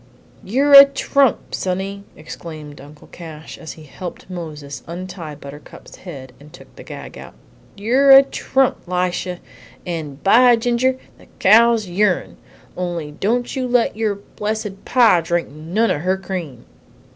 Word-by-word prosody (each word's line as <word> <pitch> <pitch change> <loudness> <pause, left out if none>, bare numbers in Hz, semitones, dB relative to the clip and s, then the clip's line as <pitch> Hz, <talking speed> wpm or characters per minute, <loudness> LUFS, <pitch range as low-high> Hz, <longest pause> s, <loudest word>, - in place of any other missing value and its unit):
"You're 275 +8 +1
a 275 0 +13
trump, 275 -1 0
sonny!" 195 +2 -3
exclaimed 155 -1 -10
Uncle 145 +2 -15
Cash, 160 -2 -11
as 160 - -8
he 155 - -14
helped 175 +5 -9
Moses 155 -5 -7
untie 170 -2 -7
Buttercup's 145 +1 -13
head 135 -8 -10
and 150 +1 -16
took - - -16
the - - -12
gag - - -10
out. - - -12 0.4
"You're 250 +7 +2
a 270 0 +10
trump, 270 -1 0
Lisha, 180 0 -2 0.5
and, 155 -5 -6
by 240 +4 +6
ginger, 245 +2 0 0.2
the - - -19
cow's 225 +1 +4
your'n; 180 +1 0 0.4
only 175 -4 -4
don't 235 - -2
you 260 -1 -2
let 245 -3 +1
your 215 -2 -1
blessed 210 0 -6
pa 230 -9 +4
drink 170 +1 -1
none 165 +10 -1
of 145 - -2
her 185 +2 0
cream!" 175 -10 -7
185 Hz, 145 wpm, -19 LUFS, 160-230 Hz, 0.5 s, a